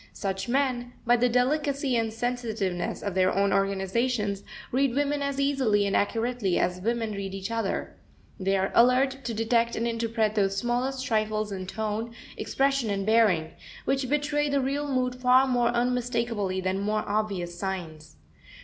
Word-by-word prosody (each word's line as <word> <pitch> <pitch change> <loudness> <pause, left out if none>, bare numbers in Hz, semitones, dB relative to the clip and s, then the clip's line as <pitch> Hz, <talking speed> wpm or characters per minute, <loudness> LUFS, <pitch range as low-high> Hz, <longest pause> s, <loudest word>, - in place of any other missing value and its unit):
Such 195 +2 -3
men, 250 -2 0
by 240 +1 +5
the 245 +1 +2
delicacy 275 +2 +1
and 225 -1 0
sensitiveness 225 -6 -2
of 200 - -2
their 185 0 +3
own 200 +1 +2
organizations, 200 +2 0 0.3
read 260 0 +1
women 290 0 0
as 280 -1 -2
easily 260 -8 +2
and 200 - 0
accurately 225 -2 0
as 180 +1 0
women 230 +1 -1
read 195 -1 -5
each 195 +3 -5
other. 225 -3 -2 0.4
They 195 +1 +1
are 190 0 0
alert 260 +3 +4
to 235 - -2
detect 230 +1 +1
and 230 - -1
interpret 225 -2 0
those 195 -2 +1
smallest 250 +4 -1
trifles 215 -1 0
in 185 -1 -5
tone, 220 +3 -3 0.2
expression, 275 -4 0
and 195 -1 -1
bearing, 210 -8 +3 0.3
which 265 -2 0
betray 295 0 +1
the 280 0 +2
real 280 +2 -1
mood 255 -1 +1
far 250 +1 +4
more 245 -2 +2
unmistakably 235 -5 0
than 185 +1 -1
more 210 +1 -1
obvious 200 -5 -2
signs. 165 - -5
230 Hz, 160 wpm, -27 LUFS, 200-250 Hz, 0.4 s, by